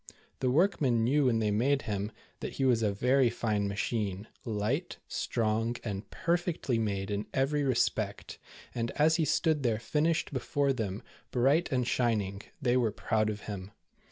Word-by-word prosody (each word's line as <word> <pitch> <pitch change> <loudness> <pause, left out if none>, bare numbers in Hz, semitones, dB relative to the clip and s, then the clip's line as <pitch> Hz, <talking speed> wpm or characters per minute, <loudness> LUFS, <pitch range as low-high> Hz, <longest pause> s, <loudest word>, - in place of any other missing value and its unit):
The 130 - +1
workmen 135 - +3
knew 140 +4 +3
when 120 -3 +3
they 110 -2 +1
made 135 +7 +2
him, 105 0 -2 0.3
that - - -5
he 135 - 0
was 120 -3 +3
a 105 -2 +2
very 125 +5 +3
fine 105 -3 -1
machine, 100 0 -2 0.2
light, 115 - -1
strong, 115 0 0
and 100 -2 -5
perfectly 170 -8 0
made 100 -2 -2
in 105 +1 -2
every 140 +3 +2
re 130 -3 +1
spect, - - -1 0.3
and 115 -1 -2
as 160 +2 +4
he 160 - +2
stood 155 +1 +2
there 115 -4 +1
finished 155 +7 0
before 140 +2 +1
them, 105 -5 -3 0.3
bright 140 +8 +2
and 125 -2 +1
shining, 105 -6 0 0.2
they 125 -4 +2
were 120 -4 +2
proud 110 +1 0
of 105 -1 -4
him. 100 -1 -7
120 Hz, 165 wpm, -30 LUFS, 105-140 Hz, 0.3 s, as